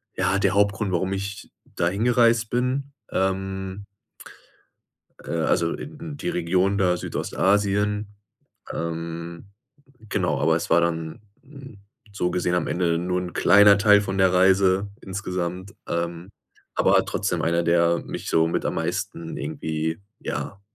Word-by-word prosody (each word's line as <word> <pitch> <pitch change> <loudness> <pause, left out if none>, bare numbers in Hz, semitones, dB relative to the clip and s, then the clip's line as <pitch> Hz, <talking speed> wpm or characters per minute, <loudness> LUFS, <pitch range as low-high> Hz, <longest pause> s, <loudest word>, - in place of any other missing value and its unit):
ja, 95 - +1
der 95 -1 +2
Hauptgrund, 100 -1 +1
warum 95 +2 0
ich 100 +1 -5
da 85 - -1
hingereist 115 +2 +2
bin, 130 +3 -1 0.2
ähm 95 +1 -2 1.4
äh, - - -9
also, 85 0 +1
in 150 0 -8
die 90 - -3
Region 90 +3 +1
da 90 -3 +2
Südostasien 105 +3 0 0.6
ähm. 85 +2 -5 0.6
Genau, - - 0
aber - - +3
es - - -4
war 85 +1 +5
dann 80 -1 -2 0.2
'n 135 -6 -13 0.3
so 90 -3 -1
gesehen 90 0 0
am 90 - 0
Ende 85 -2 +1
nur 90 +1 -1
'n 90 -1 -6
kleiner 100 -1 +6
Teil 105 0 +6
von 95 -1 -3
der 95 -1 +4
Reise 95 +1 +3
insgesamt, 95 0 -4
ähm, 85 +2 -3 0.4
aber - - +4
trotzdem - - -2
einer, 85 +1 +1
der 85 0 +3
mich - - -6
so 80 0 +3
mit 85 - -1
am - - -1
meisten 85 -1 -3
irgendwie, 80 +1 -3 0.2
ja, 100 - -5
95 Hz, 135 wpm, -24 LUFS, 85-100 Hz, 1.4 s, kleiner